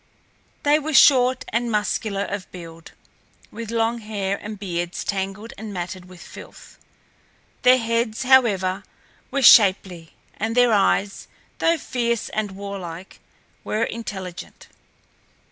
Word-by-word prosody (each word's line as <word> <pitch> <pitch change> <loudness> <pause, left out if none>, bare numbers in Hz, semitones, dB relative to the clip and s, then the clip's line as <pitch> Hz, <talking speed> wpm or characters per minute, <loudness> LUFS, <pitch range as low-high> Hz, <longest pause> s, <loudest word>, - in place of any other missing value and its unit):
They 295 +1 +4
were 310 0 -3
short 255 -2 +5
and 235 +2 -1
muscular 210 -1 -1
of 200 -2 -6
build, 165 -2 -11 0.6
with 230 0 -7
long 230 +1 0
hair 205 -3 -3
and 210 0 -7
beards 175 -3 -4
tangled 195 +3 -4
and 215 -1 -7
matted 180 -1 -6
with 180 -1 -14
filth. - - -13 0.8
Their 255 +1 +6
heads, 230 0 -1
however, 200 -8 +3 0.5
were 275 +1 -1
shapely, 185 -7 +5 0.2
and 225 +3 -3
their 245 -2 +5
eyes, 200 0 +1 0.3
though 335 0 +2
fierce 235 -5 -2
and 215 -1 -2
warlike, 190 -3 -8 0.4
were 215 +1 -1
intelligent. 190 -6 -7
210 Hz, 120 wpm, -22 LUFS, 190-235 Hz, 0.8 s, Their